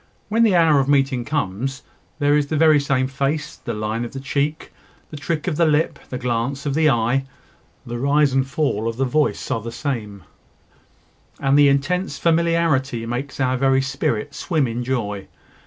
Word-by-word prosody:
When 225 Hz, +2 st, +2 dB
the 220 Hz, -5 st, +4 dB
hour 160 Hz, -4 st, +5 dB
of 135 Hz, -, 0 dB
meeting 135 Hz, -3 st, +2 dB
comes, 135 Hz, -2 st, -3 dB, 0.3 s
there 145 Hz, -1 st, +3 dB
is 145 Hz, -1 st, +1 dB
the 155 Hz, -, -1 dB
very 155 Hz, -1 st, +5 dB
same 135 Hz, -2 st, +1 dB
face, 140 Hz, +3 st, -2 dB
the 120 Hz, -, -5 dB
line 110 Hz, +2 st, -2 dB
of 120 Hz, -, -7 dB
the 135 Hz, -, -5 dB
cheek, 140 Hz, +3 st, -2 dB, 0.4 s
the -, -, -7 dB
trick 150 Hz, +2 st, -3 dB
of 170 Hz, -5 st, -1 dB
the 170 Hz, -, +4 dB
lip, 150 Hz, +1 st, +1 dB
the 125 Hz, -, -4 dB
glance 125 Hz, +3 st, -2 dB
of 140 Hz, -, -1 dB
the 155 Hz, +1 st, +3 dB
eye; 120 Hz, +2 st, +1 dB, 0.6 s
the 120 Hz, 0 st, -5 dB
rise 140 Hz, +1 st, +2 dB
and 135 Hz, 0 st, +1 dB
fall 135 Hz, -6 st, -1 dB
of 115 Hz, 0 st, -3 dB
the 135 Hz, -, +1 dB
voice 150 Hz, +4 st, 0 dB
are 115 Hz, -, 0 dB
the 115 Hz, +2 st, -6 dB
same; 110 Hz, -, -4 dB, 1.2 s
and 135 Hz, 0 st, +2 dB
the 145 Hz, 0 st, +6 dB
intense 160 Hz, +8 st, 0 dB
familiarity 165 Hz, -8 st, +1 dB
makes 125 Hz, +5 st, -5 dB
our 130 Hz, -1 st, +1 dB
very 135 Hz, 0 st, +2 dB
spirit 140 Hz, -2 st, -2 dB
swim 155 Hz, -5 st, 0 dB
in 120 Hz, +1 st, -3 dB
joy. 105 Hz, -6 st, -3 dB
135 Hz, 185 wpm, -21 LUFS, 125-150 Hz, 1.2 s, the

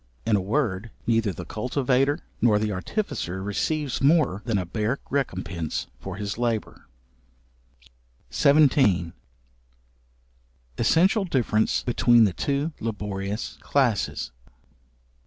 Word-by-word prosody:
In 110 Hz, -2 st, +3 dB
a 100 Hz, -, +1 dB
word, 110 Hz, -1 st, -1 dB, 0.2 s
neither 115 Hz, -3 st, +2 dB
the 90 Hz, 0 st, -7 dB
cultivator, 130 Hz, -, 0 dB, 0.2 s
nor 110 Hz, -3 st, +4 dB
the 105 Hz, 0 st, -1 dB
artificer 95 Hz, -, -3 dB
receives 140 Hz, +7 st, -1 dB
more 140 Hz, -, +3 dB
than 115 Hz, -4 st, 0 dB
a 90 Hz, -, -1 dB
bare 110 Hz, +8 st, -1 dB
recompense 95 Hz, -, -2 dB
for 95 Hz, +5 st, -6 dB
his 100 Hz, +2 st, -4 dB
labour. 115 Hz, -3 st, -2 dB, 1.4 s
§17. 135 Hz, -, +4 dB, 1.7 s
Essential 190 Hz, +5 st, +3 dB
difference 120 Hz, -, +1 dB
between 120 Hz, -1 st, +4 dB
the 100 Hz, -4 st, +2 dB
two 140 Hz, -, -1 dB
laborious 105 Hz, -1 st, -4 dB
classes. 120 Hz, -, 0 dB
115 Hz, 100 wpm, -25 LUFS, 100-140 Hz, 1.7 s, nor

